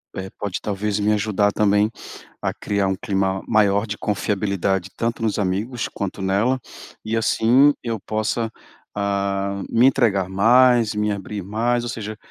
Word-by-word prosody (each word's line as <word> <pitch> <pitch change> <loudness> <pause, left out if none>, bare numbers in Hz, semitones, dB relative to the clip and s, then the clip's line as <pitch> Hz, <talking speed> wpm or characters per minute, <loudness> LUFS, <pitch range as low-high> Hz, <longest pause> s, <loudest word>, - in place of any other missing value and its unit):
é, 95 0 -5
pode 100 -3 -3
talvez 105 0 -2
me 105 +1 +2
ajudar 105 -1 +1
também 105 +1 +2 0.5
a - - 0
criar 100 -1 -1
um 95 - 0
clima 95 0 -1
maior 105 -1 +3
de 105 -1 -5
confiabilidade 100 -2 -1
tanto 115 0 -2
nos 110 -2 0
amigos 105 +5 -1
quanto 100 0 -5
nela. 105 +7 +1 0.5
E 110 - -1
assim 120 +5 +4
eu 115 -3 -3
possa, 110 +2 -2 0.4
ah, 100 -1 -1
me 120 +3 +4
entregar 110 -8 +3
mais, 115 +2 +4
me 105 0 0
abrir 100 0 -5
mais, 120 +4 0
ou 120 - -4
seja, 110 -2 -5
105 Hz, 150 wpm, -22 LUFS, 100-115 Hz, 0.5 s, assim